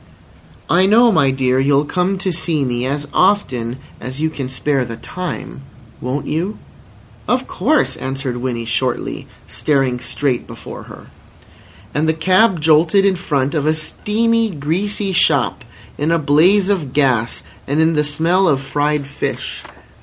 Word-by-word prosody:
"I 180 +5 +4
know, 230 +3 +5
my 150 -8 +3
dear, 130 -1 +1
you'll 140 +2 +3
come 180 +4 0
to 185 -1 -2
see 160 -3 0
me 125 0 -1
as 145 +2 -3
often 130 - +1 0.2
as 130 +2 -6
you 160 +1 0
can 135 -4 -5
spare 135 +1 0
the 115 -1 -6
time. 180 -3 -6 0.4
Won't 135 +3 -3
you?" 175 +9 -2 0.7
"Of 255 +1 +1
course," 285 +12 +1
answered 130 -1 -3
Winnie 120 -2 -3
shortly, 125 +1 -2 0.2
staring 125 +2 0
straight 130 +1 -2
before - - -9
her. - - -13 0.8
And 155 +2 +1
the - - +3
cab 185 +3 +3
jolted 160 +5 +4
in 195 -1 +3
front 145 -6 -1
of 150 -2 0
a 155 - +3
steamy, 225 +8 0
greasy 190 +6 -2
shop 140 -7 +2 0.4
in 150 +2 0
a 165 - +3
blaze 170 +7 +3
of 160 -10 -1
gas 125 -5 +1 0.2
and 145 +3 0
in 160 +1 +3
the 150 -1 +2
smell 165 +6 +2
of 140 -4 +3
fried 145 +1 -1
fish. 145 +1 -4
150 Hz, 155 wpm, -18 LUFS, 135-185 Hz, 0.8 s, know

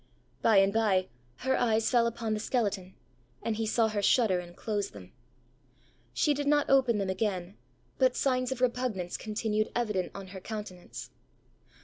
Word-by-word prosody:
By 220 -3 +5
and 195 0 +5
by 195 -4 +2 0.4
her 265 0 +3
eyes 225 -2 +2
fell 235 -2 +4
upon 230 -1 -2
the 215 - -1
skeleton, 205 -5 -1 0.5
and 225 -2 -1
he 225 -1 -1
saw 225 +1 +3
her 215 -2 -1
shudder 200 -3 +3
and 175 0 -10
close 205 -2 -2
them. 95 -3 -12 1.0
She 140 - +2
did 285 0 -2
not 290 0 +3
open 260 -5 +4
them 195 -2 -1
again, 190 -1 -2 0.4
but 255 -1 +4
signs 255 -1 +1
of 255 -1 -3
repugnance 240 -8 0
continued 215 0 -1
evident 210 -7 -1
on 195 -1 -8
her 190 0 -8
countenance. 210 -4 -7
215 Hz, 160 wpm, -30 LUFS, 190-240 Hz, 1.0 s, By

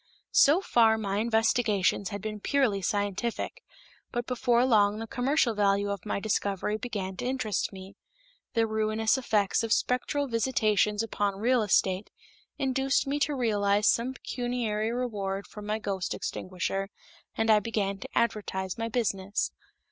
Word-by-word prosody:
So 305 +7 +6
far 225 - +4
my 200 -2 -2
investigations 220 -3 +1
had 205 -2 -6
been 215 -1 -4
purely 235 -5 +1
scientific, 205 - -2 0.5
but 240 -1 -2
before 245 -1 +2
long 210 -4 +4
the 225 - -4
commercial 250 +1 +1
value 200 -1 +2
of 200 +1 -5
my - - -1
discovery 200 -1 -1
began 195 -5 -4
to - - -4
interest 255 -5 -1
me. 190 0 -11 0.6
The 230 -1 +3
ruinous 220 0 +1
effects 215 -7 +1
of 230 -1 -3
spectral 250 +5 +1
visitations 220 -3 +1
upon 205 -3 -1
real 240 +4 +2
estate 190 -1 +1 0.5
induced 270 +1 +1
me 280 +1 -1
to 290 0 +1
realize 205 -4 +2
some 245 +3 +2
pecuniary 235 -4 -2
reward 205 -5 -3
from 210 -1 -10
my 215 +1 0
ghost 195 -4 -3
extinguisher, 195 +1 -3 0.5
and 225 0 +3
I 215 - +6
began 200 -2 -2
to - - -8
advertise 195 -4 -1
my 230 0 -2
business. 200 -4 -1
215 Hz, 145 wpm, -28 LUFS, 200-240 Hz, 0.6 s, So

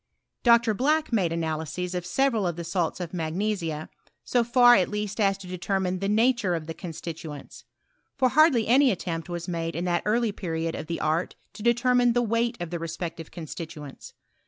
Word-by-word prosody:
Dr. 235 -2 +5
Black 300 +5 +1
made 185 -7 +2
ana 160 -2 -1
lyses 180 +3 -4
of 180 -1 -3
several 230 -1 +1
of 175 - -2
the 170 - -5
salts 170 +1 -1
of 175 -1 -5
magnesia, 165 -1 -2 0.4
so 245 -1 +2
far 245 +1 +6
at 190 -6 +3
least 210 0 -4
as 195 -2 +3
to 195 - -11
determine 185 0 -2
the 195 +1 -1
nature 220 -3 +2
of 160 -2 -4
the 165 - -5
con 175 - -8
stituents. 160 -2 -8 0.5
F<ir 255 -2 +3
hardly 295 -6 +5
any 265 +4 +5
attempt 175 -4 -3
was 170 -1 -5
made 165 -1 -3
in 175 - -2
that 175 -1 +1
early 225 +1 +1
period 165 -4 -3
of 155 - -6
the 170 - -3
art 160 +3 0 0.2
to - - -10
determine 240 +1 +3
the 245 0 +2
weight 235 +1 0
of 175 -1 -5
the 170 - -3
respective 165 0 -5
constituents. 155 -3 -8
185 Hz, 190 wpm, -26 LUFS, 165-235 Hz, 0.5 s, far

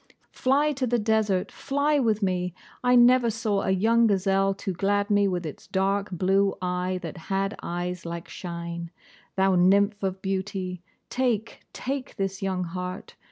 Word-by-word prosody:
Fly 285 +4 +2
to 260 -2 -1
the 240 +1 +2
desert, 215 -4 +1
fly 285 +2 0
with 220 -4 +1
me! 180 -2 -1 0.3
I 250 0 +4
never 245 0 +6
saw 215 -3 0
a - - -1
young 225 +5 +4
gazelle 195 -1 +2
to 190 - -4
glad 200 +3 0
me 205 -1 +4
with 180 -3 -2
its 155 - -8
dark 195 +1 0
blue 195 +2 +2
eye 180 0 -1
that 165 0 -6
had 195 +2 0
eyes 175 +1 -4
like 170 0 -6
shine. 170 -1 -6 0.5
Thou 190 0 +3
nymph 200 +3 +3
of 190 -1 -2
beauty, 190 -2 -3 0.3
take, 240 -4 -1
take 270 0 -4
this 195 -1 -3
young 190 -2 -1
heart. 180 +2 -6
195 Hz, 160 wpm, -26 LUFS, 180-220 Hz, 0.5 s, never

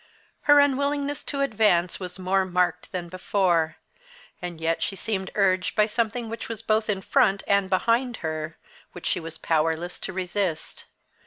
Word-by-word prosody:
Her 290 0 +9
unwillingness 285 +1 +1
to 280 -1 -2
advance 210 -9 +2
was 180 -1 -6
more 190 +1 +1
marked 180 -1 0
than 180 -2 -4
before, 175 -2 +1 0.6
and 175 -2 -6
yet 165 0 0
she 195 - -1
seemed 195 -2 -3
urged 185 -2 +2
by 210 - +5
something 230 +1 -1
which 230 +1 -6
was 225 -1 -6
both 215 -1 +1
in 195 -2 0
front 205 -7 +3
and 200 -1 +2
behind 230 +6 +1
her, 155 0 -4 0.4
which 175 - -9
she - - +1
was 165 -1 -7
powerless 165 +2 0
to - - -4
resist. 185 -2 -3
190 Hz, 160 wpm, -25 LUFS, 175-225 Hz, 0.6 s, Her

